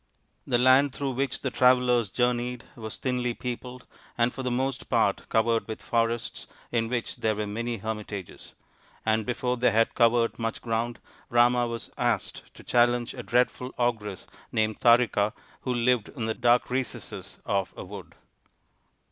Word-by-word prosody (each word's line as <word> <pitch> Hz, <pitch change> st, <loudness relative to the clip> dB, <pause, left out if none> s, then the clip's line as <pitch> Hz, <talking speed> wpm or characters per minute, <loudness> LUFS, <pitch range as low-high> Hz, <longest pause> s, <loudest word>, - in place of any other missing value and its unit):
The 120 Hz, -, +3 dB
land 130 Hz, +2 st, +5 dB
through 140 Hz, -1 st, -2 dB
which 130 Hz, +1 st, -2 dB
the 130 Hz, -, -2 dB
travellers 125 Hz, -3 st, +4 dB
journeyed 125 Hz, +2 st, 0 dB
was 110 Hz, -2 st, -7 dB
thinly 125 Hz, -2 st, -1 dB
peopled 125 Hz, 0 st, -6 dB, 0.3 s
and 120 Hz, +1 st, +2 dB
for 135 Hz, -, -5 dB
the 125 Hz, -, -1 dB
most 130 Hz, +1 st, -2 dB
part -, -, +1 dB
covered 115 Hz, 0 st, +2 dB
with 110 Hz, -, -6 dB
forests 115 Hz, -1 st, -1 dB, 0.2 s
in 115 Hz, -1 st, 0 dB
which 120 Hz, -1 st, -2 dB
there 110 Hz, -1 st, 0 dB
were 105 Hz, 0 st, -2 dB
many 115 Hz, +3 st, -3 dB
hermitages; 105 Hz, -3 st, -6 dB, 0.5 s
and 110 Hz, 0 st, +1 dB
before 125 Hz, 0 st, -1 dB
they 125 Hz, -, +4 dB
had 115 Hz, +1 st, +2 dB
covered 115 Hz, -1 st, +3 dB
much 115 Hz, -1 st, -2 dB
ground 115 Hz, +1 st, -2 dB, 0.3 s
Rama 120 Hz, 0 st, +4 dB
was 115 Hz, -1 st, -5 dB
asked -, -, -1 dB
to -, -, -13 dB
challenge 120 Hz, 0 st, +2 dB
a 125 Hz, -, -6 dB
dreadful 125 Hz, +2 st, 0 dB
ogress 110 Hz, -5 st, -1 dB, 0.3 s
named 110 Hz, -1 st, 0 dB
Tarika 115 Hz, -3 st, +4 dB, 0.3 s
who 130 Hz, -, -2 dB
lived 120 Hz, -2 st, +2 dB
in 120 Hz, -6 st, -5 dB
the 110 Hz, -, 0 dB
dark 120 Hz, +2 st, +2 dB
recesses 130 Hz, -2 st, -4 dB
of 95 Hz, -3 st, 0 dB
a -, -, -6 dB
wood. 90 Hz, -4 st, -10 dB
120 Hz, 155 wpm, -27 LUFS, 110-125 Hz, 0.5 s, land